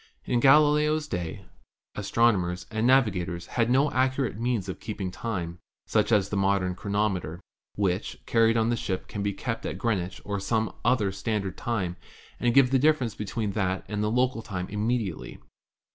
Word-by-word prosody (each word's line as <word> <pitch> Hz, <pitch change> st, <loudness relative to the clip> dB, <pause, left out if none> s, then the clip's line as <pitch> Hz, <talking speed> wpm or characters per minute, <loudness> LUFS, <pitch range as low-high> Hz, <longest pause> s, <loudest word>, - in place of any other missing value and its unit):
In 125 Hz, -, +1 dB
Galileo's 150 Hz, +3 st, +4 dB
day 90 Hz, -, -4 dB, 0.5 s
astronomers 95 Hz, -4 st, +1 dB
and 110 Hz, +2 st, +1 dB
navigators 90 Hz, -10 st, +2 dB
had 115 Hz, -1 st, 0 dB
no 135 Hz, +4 st, +3 dB
ac 130 Hz, 0 st, +2 dB
curate 135 Hz, -6 st, -1 dB
means 115 Hz, -5 st, -1 dB
of 95 Hz, -, -5 dB
keeping 100 Hz, -4 st, -4 dB
time, 90 Hz, -5 st, -4 dB, 0.3 s
such -, -, +1 dB
as 100 Hz, -3 st, +3 dB
the 105 Hz, -, -3 dB
modern 95 Hz, -2 st, +1 dB
chro 100 Hz, -, -8 dB
nometer, 95 Hz, -5 st, -1 dB, 0.4 s
which, 95 Hz, -1 st, -1 dB
carried 115 Hz, 0 st, +3 dB
on 115 Hz, +1 st, +2 dB
a -, -, +2 dB
ship, 95 Hz, -4 st, -3 dB
can 105 Hz, -, -5 dB
be 100 Hz, 0 st, 0 dB
kept 115 Hz, +3 st, -4 dB
at -, -, -4 dB
Green 115 Hz, -5 st, +1 dB
wich 90 Hz, 0 st, -7 dB
or 100 Hz, -1 st, -2 dB
some 110 Hz, +3 st, -1 dB
other 110 Hz, -6 st, +2 dB
standard 100 Hz, -1 st, -2 dB
time 95 Hz, -7 st, -2 dB, 0.4 s
and 120 Hz, -1 st, +1 dB
give 135 Hz, -2 st, +6 dB
the 135 Hz, -, +4 dB
difference 135 Hz, -6 st, +2 dB
between 105 Hz, 0 st, -3 dB
that 95 Hz, -2 st, -1 dB
and 105 Hz, +1 st, -3 dB
local 120 Hz, +2 st, +1 dB
time 95 Hz, -4 st, -5 dB
immediately. 105 Hz, -3 st, -2 dB
105 Hz, 175 wpm, -27 LUFS, 95-120 Hz, 0.5 s, give